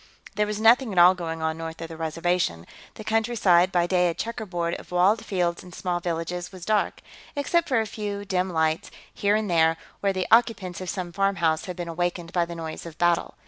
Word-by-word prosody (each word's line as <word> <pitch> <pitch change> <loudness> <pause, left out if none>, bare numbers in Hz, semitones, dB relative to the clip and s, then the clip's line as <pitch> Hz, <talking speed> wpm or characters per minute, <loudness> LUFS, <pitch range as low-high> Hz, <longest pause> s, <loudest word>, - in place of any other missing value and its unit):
There 210 +1 0
was 210 0 -3
nothing 230 +2 +5
at 190 - -6
all 175 +1 +8
going 165 -3 -5
on 160 0 -1
north 165 0 -6
of 165 - -5
the 165 - -9
Reservation; 160 - -1 0.3
the 215 - -8
countryside, 210 -5 +3
by 175 -2 +2
day 180 0 +2
a 165 - -3
checkerboard 185 -7 -3
of - - -14
walled 190 +5 +3
fields 175 -3 -1
and 180 - -12
small 175 -1 -2
villages, 175 +1 -3
was 185 -2 -10
dark, 215 -1 0 0.3
except 335 +4 +1
for 255 -4 +3
a 205 -2 -4
dim 190 -1 0
light, 160 -1 0 0.2
here 205 +1 +1
and 215 0 0
there, 165 -2 +3 0.2
where 200 - +1
the 185 -1 -2
occupants 210 -6 +3
of 185 - -5
some 180 -3 -4
farmhouse 175 -5 +1
had 180 - -5
been 175 -1 -5
awakened 175 0 -3
by 175 -1 +2
the 170 0 -8
noise 165 0 -6
of 165 -1 -11
battle. 175 -1 +1
180 Hz, 210 wpm, -25 LUFS, 170-205 Hz, 0.3 s, all